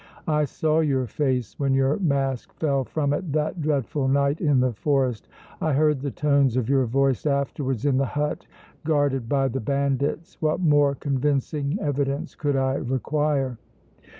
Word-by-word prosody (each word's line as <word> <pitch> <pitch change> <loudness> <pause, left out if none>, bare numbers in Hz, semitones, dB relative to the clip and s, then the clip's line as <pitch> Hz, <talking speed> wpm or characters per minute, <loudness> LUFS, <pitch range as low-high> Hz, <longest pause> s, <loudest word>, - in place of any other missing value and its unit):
I 150 -1 +2
saw 155 +2 0
your 135 -5 +1
face 125 -1 -2
when 135 -2 +1
your 135 +2 +2
mask 135 -7 -1
fell 140 -4 0
from 145 +1 -1
it 160 +1 -3
that 155 +3 -1
dreadful 145 -2 0
night 140 +2 +1
in 145 -5 +3
the 125 -1 +1
forest! 130 -2 0 0.3
I 155 - +1
heard 150 -1 +2
the 140 - -2
tones 140 -3 +2
of 120 -3 0
your 135 -2 +2
voice 135 +3 +1
afterwards 140 -2 -1
in 140 -2 +3
the 135 0 +1
hut 150 0 -2 0.4
guarded 145 -6 0
by 135 -1 +2
the 135 +1 -3
bandits! 140 +5 -1
What 155 -1 +1
more 145 -4 +3
convincing 140 +3 -1
evidence 140 -1 -2
could 145 -2 -1
I 135 0 +1
require?" 135 0 -1
140 Hz, 160 wpm, -24 LUFS, 135-150 Hz, 0.4 s, in